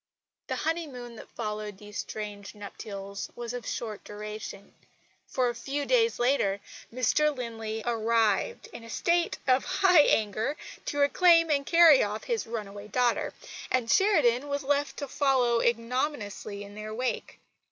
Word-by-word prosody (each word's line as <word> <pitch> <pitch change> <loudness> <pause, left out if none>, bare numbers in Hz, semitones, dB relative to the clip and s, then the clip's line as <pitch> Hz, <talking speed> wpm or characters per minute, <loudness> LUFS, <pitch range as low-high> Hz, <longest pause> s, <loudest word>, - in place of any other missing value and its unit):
The - - -2
honeymoon 285 -8 -3
that - - -11
followed 210 -2 -5
these 205 0 -8
strange 205 -2 -6
nuptials 200 -1 -7
was 240 0 -5
of 245 -1 -6
short 215 -3 -4
duration; 210 -1 -8 0.5
for, 255 -2 +1
a 240 - 0
few 275 +5 -3
days 465 -2 +3
later, 240 -6 +2 0.3
Mr 255 +5 +2
Linley 225 -2 -4
arrived, 225 -3 +1
in - - -8
a - - -12
high - - -12
state 340 +8 +1
of 260 +8 +1
anger, 285 - +4 0.3
to 290 - -3
reclaim 330 +3 +5
and 280 -1 +1
carry 335 -5 +7
off 210 +1 -2
his 465 - -2
runaway 205 -2 -6
daughter; 245 +3 +1 0.4
and 250 -3 +1
Sheridan 290 - +3
was 285 0 -2
left 285 +1 0
to 285 - -4
follow 255 -4 +2
ignominiously 230 -4 -2
in 200 0 -11
their 215 +1 -6
wake. 250 +2 -3
240 Hz, 145 wpm, -28 LUFS, 215-285 Hz, 0.5 s, carry